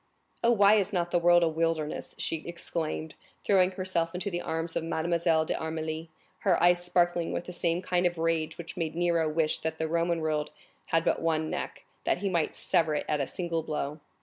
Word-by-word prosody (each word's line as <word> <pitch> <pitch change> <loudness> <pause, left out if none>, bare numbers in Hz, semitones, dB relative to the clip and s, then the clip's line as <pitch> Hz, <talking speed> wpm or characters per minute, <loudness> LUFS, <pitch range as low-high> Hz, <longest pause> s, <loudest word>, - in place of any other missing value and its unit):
"Oh, 230 - +5
why 210 -2 +6
is 200 -1 0
not 175 -3 -1
the 175 - +3
world 175 0 +5
a - - +4
wilderness?" 160 -1 -1
she 165 - -1
exclaimed, 160 -2 -3 0.3
throwing 185 -2 +4
herself 180 -3 -1
into 190 +3 -2
the 175 0 -2
arms 165 +1 -3
of - - 0
Mademoiselle 165 0 +1
d'Armilly, 160 0 -3 0.3
her 185 -4 +2
eyes 175 0 +4
sparkling 175 -1 +1
with - - -2
the 180 - -7
same 170 +1 0
kind 180 -1 +2
of 175 -1 -4
rage 165 -1 0
which 170 +1 -8
made 165 -3 -3
Nero 170 -2 +2
wish 155 0 +1
that 160 0 -3
the 160 - -1
Roman 170 +1 +1
world 155 -1 -1 0.4
had 165 0 +1
but - - +1
one 160 -1 0
neck, - - -5 0.2
that - - +1
he 195 +2 -1
might 170 -3 0
sever 165 -4 +2
it - - -2
at 150 -1 0
a 135 - -1
single 170 +2 -2
blow. 150 -1 -3
165 Hz, 205 wpm, -29 LUFS, 160-175 Hz, 0.4 s, why